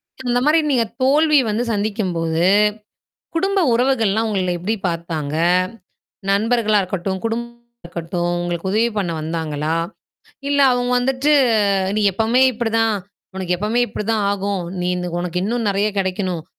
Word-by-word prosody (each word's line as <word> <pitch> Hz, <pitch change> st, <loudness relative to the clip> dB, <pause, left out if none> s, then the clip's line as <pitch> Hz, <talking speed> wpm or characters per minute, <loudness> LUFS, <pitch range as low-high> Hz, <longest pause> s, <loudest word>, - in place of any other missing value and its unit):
அந் 260 Hz, -1 st, -10 dB
அந்த 245 Hz, 0 st, +2 dB
மாரி 310 Hz, +2 st, +4 dB
நீங்கத் 235 Hz, -4 st, 0 dB
தோல்வி 300 Hz, +3 st, +4 dB
வந்து 215 Hz, +3 st, 0 dB
சந்திக்கும்போது, 185 Hz, -6 st, -1 dB, 0.9 s
குடும்ப 390 Hz, +3 st, +1 dB
உறவுகள்லாம் 225 Hz, -4 st, +2 dB
உங்கள 185 Hz, -3 st, 0 dB
எப்படி 205 Hz, +6 st, -1 dB
பார்த்தாங்க? 165 Hz, -3 st, -3 dB, 0.9 s
நண்பர்களா 215 Hz, +1 st, +2 dB
இருக்கட்டும், 190 Hz, 0 st, -3 dB
குடும்பமா 235 Hz, +1 st, -6 dB
இருக்கட்டும், 175 Hz, +1 st, -3 dB
உங்களுக்கு 175 Hz, +1 st, -3 dB
உதவி 225 Hz, +3 st, +2 dB
பண்ண 185 Hz, -4 st, -1 dB
வந்தாங்களா? 155 Hz, -1 st, -2 dB, 0.7 s
இல்ல 285 Hz, 0 st, +2 dB
அவங்க 245 Hz, 0 st, 0 dB
வந்துட்டு, 270 Hz, +3 st, +1 dB, 0.7 s
நீ -, -, +2 dB
எப்பவுமே 225 Hz, +6 st, +2 dB
இப்படி 230 Hz, 0 st, -2 dB
தான். 225 Hz, -2 st, +2 dB, 0.4 s
உனக்கு 180 Hz, -2 st, -1 dB
எப்பவுமே 215 Hz, +6 st, 0 dB
இப்படி 210 Hz, 0 st, -5 dB
தான் 215 Hz, -2 st, +1 dB
ஆகும். 200 Hz, -2 st, -2 dB, 0.2 s
நீ 180 Hz, -, -1 dB
இந்த 180 Hz, 0 st, -3 dB
உனக்கு 180 Hz, 0 st, -2 dB
இன்னும் 230 Hz, +1 st, -1 dB
நிறைய 200 Hz, +1 st, +1 dB
கிடைக்கணும், 185 Hz, -3 st, -2 dB
210 Hz, 140 wpm, -20 LUFS, 180-235 Hz, 0.9 s, மாரி